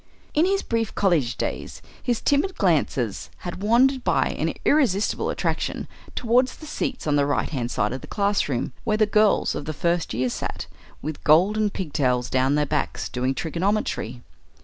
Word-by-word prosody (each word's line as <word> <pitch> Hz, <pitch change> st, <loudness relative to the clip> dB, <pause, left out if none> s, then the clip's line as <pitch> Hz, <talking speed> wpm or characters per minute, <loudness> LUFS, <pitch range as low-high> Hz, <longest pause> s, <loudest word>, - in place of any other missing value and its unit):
In 310 Hz, +3 st, +4 dB
his 395 Hz, +1 st, +1 dB
brief 230 Hz, -2 st, -1 dB
college 165 Hz, -11 st, +2 dB
days -, -, -4 dB, 0.2 s
his 240 Hz, -3 st, -1 dB
timid 310 Hz, +7 st, +1 dB
glances 145 Hz, -, 0 dB, 0.2 s
had 175 Hz, +1 st, -5 dB
wandered 250 Hz, +5 st, +3 dB
by -, -, +2 dB
an -, -, -2 dB
irresistible 225 Hz, -10 st, +2 dB
attraction -, -, -2 dB, 0.3 s
towards 250 Hz, +2 st, +2 dB
the 310 Hz, -, -11 dB
seats 265 Hz, -3 st, -3 dB
on 150 Hz, -1 st, +2 dB
the 140 Hz, -, +3 dB
right 145 Hz, -, 0 dB
hand 125 Hz, -5 st, -2 dB
side 105 Hz, -1 st, 0 dB
of 130 Hz, -, -5 dB
the -, -, -10 dB
class 200 Hz, -5 st, 0 dB
room, 125 Hz, -1 st, -2 dB
where 215 Hz, -2 st, +1 dB
the 215 Hz, -, +4 dB
girls 210 Hz, 0 st, +3 dB
of 145 Hz, -, -5 dB
the 155 Hz, -, -3 dB
first 170 Hz, +2 st, 0 dB
year 125 Hz, +2 st, +1 dB
sat, -, -, -4 dB, 0.4 s
with 155 Hz, -1 st, -5 dB
golden 205 Hz, +8 st, +4 dB
pigtails 135 Hz, -10 st, -1 dB
down 130 Hz, +2 st, +2 dB
their 150 Hz, 0 st, +2 dB
backs, 150 Hz, +1 st, -2 dB
doing 130 Hz, +2 st, -1 dB
trigonometry. 170 Hz, -, -2 dB
175 Hz, 170 wpm, -24 LUFS, 140-220 Hz, 0.4 s, In